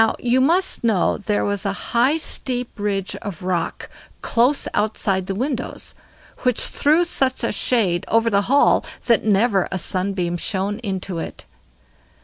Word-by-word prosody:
Now, 225 - +1
you 250 +1 +1
must 340 +5 +2
know 220 -6 +1
there 205 0 -1
was 205 -1 0
a 200 -1 -1 0.2
high 255 +6 +3
steep 250 -5 -1
ridge 200 -2 -2
of 195 -3 -8
rock 180 -2 -2 0.3
close 250 +5 +2
outside 195 -3 0
the 195 - -3
windows, 255 +3 -3 0.5
which 250 -2 +1
threw 315 +4 +2
such 265 -7 +1
a 230 - +1
shade 200 -7 +1
over 230 0 +2
the 200 0 +3
hall 280 +2 +4 0.2
that 235 -2 +3
never 205 -2 +2
a 190 - -1
sunbeam 185 -1 -1
shone 200 +3 -2
into 190 -5 -4
it. - - -7
210 Hz, 150 wpm, -21 LUFS, 195-250 Hz, 0.5 s, hall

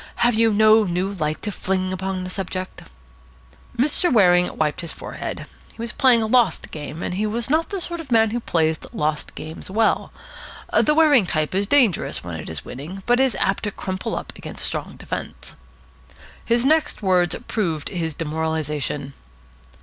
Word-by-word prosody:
Have 240 - +4
you 225 0 +3
no 215 +1 +6
new 185 +1 -1
light 155 -5 -3
to 210 - -2
fling 185 -1 -1
upon 190 0 -3
the 185 - -5
subject?" 185 -1 -5 1.0
Mr. 300 +8 +3
Waring 180 -6 +4
wiped 150 -2 0
his 170 -1 -1
forehead. - - -6 0.3
He - - -24
was 230 -1 -4
playing 245 -4 +5
a - - 0
lost 225 -5 +2
game, 155 +2 -6
and - - -2
he 210 +4 -1
was 235 +4 -2
not 320 +2 +2
the 400 -2 -3
sort 345 -1 -4
of 305 -6 -9
man 225 -2 +4
who 240 - -1
plays 160 -7 0
lost 150 0 -2
games 155 +3 -7
well. 220 +4 +1 0.6
The 300 - +4
Waring 295 - +5
type 155 0 -1
is 195 +2 +1
dangerous 245 - +2
when 85 0 -6
it 80 -1 -6
is 80 -3 -6
winning, 170 +9 -8
but 245 +1 +3
it 265 - +5
is 250 -7 -1
apt 195 - +1
to 205 - -2
crumple 190 +4 -4
up - - -6
against - - -5
strong - - -3
defence. - - -7 0.9
His 235 +1 +1
next 310 -5 +2
words 180 -3 +3
proved 165 -9 -1
his 165 -4 -3
demoralisation. 150 -3 -2
190 Hz, 180 wpm, -22 LUFS, 160-230 Hz, 1.0 s, no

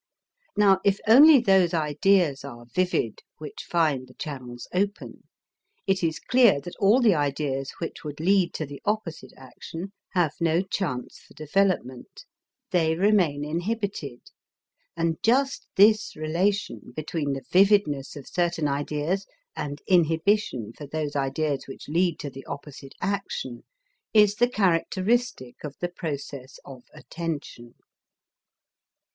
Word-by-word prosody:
Now 195 -2 +5
if 200 -1 +2
only 280 +6 +9
those 190 -6 +3
ideas 155 -1 +2
are 120 -4 -9
vivid 120 -4 -1 0.2
which 155 - -8
find 150 -7 +1
the 125 - -18
channels 125 -5 -7
open, 200 +3 -3 0.6
it 190 -2 +1
is 160 -2 0
clear 240 - +4
that 175 - -9
all 205 +5 +4
the 225 -5 +5
ideas 140 -2 -1
which 165 - -6
would 150 -1 -7
lead 185 +1 +3
to 155 - -2
the 140 0 -10
opposite 175 - -3
action 165 +8 -9 0.2
have 175 -5 +2
no 165 +2 +2
chance 165 -10 -4
for - - -20
development; 155 -6 -1 0.5
they 160 -3 +2
remain 175 -7 +2
inhibited, 170 - -3 0.8
and 165 -1 0
just 270 +4 +1
this 215 +2 +4
relation 180 +6 -1
between 155 -2 -2
the 135 -2 -6
vividness 185 -8 +3
of 140 -3 -10
certain 175 -3 0
ideas 150 +6 -2 0.3
and 145 0 -5
inhibition 165 - +1
for 145 - -10
those 150 0 -3
ideas 140 +1 -1
which 135 - -10
lead 170 +2 +1
to 145 - -5
the 135 +1 -10
opposite 140 -1 -9
action 195 -10 -3 0.5
is 210 -1 +6
the 240 0 +3
characteristic 190 - 0
of 145 -2 -6
the 175 - -2
process 140 -6 -6
of 130 -2 -11
attention. 150 -8 -7
165 Hz, 130 wpm, -25 LUFS, 140-195 Hz, 0.8 s, only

